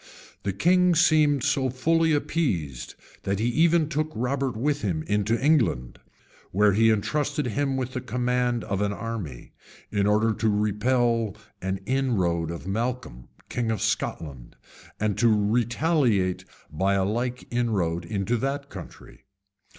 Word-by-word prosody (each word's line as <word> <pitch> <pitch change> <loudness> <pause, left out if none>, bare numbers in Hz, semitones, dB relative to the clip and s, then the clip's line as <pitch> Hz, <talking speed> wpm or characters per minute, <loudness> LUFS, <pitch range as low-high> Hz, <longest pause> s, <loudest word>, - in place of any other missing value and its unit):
The 100 - -1
king 180 - +3
seemed 150 -4 +4
so 130 -1 +1
fully 160 +6 +2
appeased 100 - -1 0.3
that 100 0 -1
he 115 +4 0
even 160 +4 +3
took 155 +1 -2
Robert 130 0 -1
with 145 +4 0
him 85 -6 -1
into 105 +4 0
England, 125 - +1 0.5
where 105 +1 +3
he 115 +3 +4
intrusted 145 +8 0
him 135 +3 -1
with 130 -1 -3
the 130 - -3
command 125 -1 0
of 100 0 -2
an 105 0 0
army, 105 - -6 0.4
in 100 -1 +1
order 110 +2 +3
to 110 0 0
repel 110 +1 +1 0.3
an 95 +1 -3
inroad 95 -11 0
of 85 0 -6
Malcolm, 115 - -3 0.2
king 120 -2 -2
of 110 -2 -1
Scotland, 65 -9 -3 0.4
and 105 -1 -1
to 120 - +4
retaliate 115 - +1 0.3
by 95 +6 +1
a 95 -1 +1
like 120 +4 -2
inroad 100 -9 0
into 105 +5 -1
that 140 +3 -3
country. 95 -4 -11
115 Hz, 140 wpm, -25 LUFS, 100-135 Hz, 0.5 s, seemed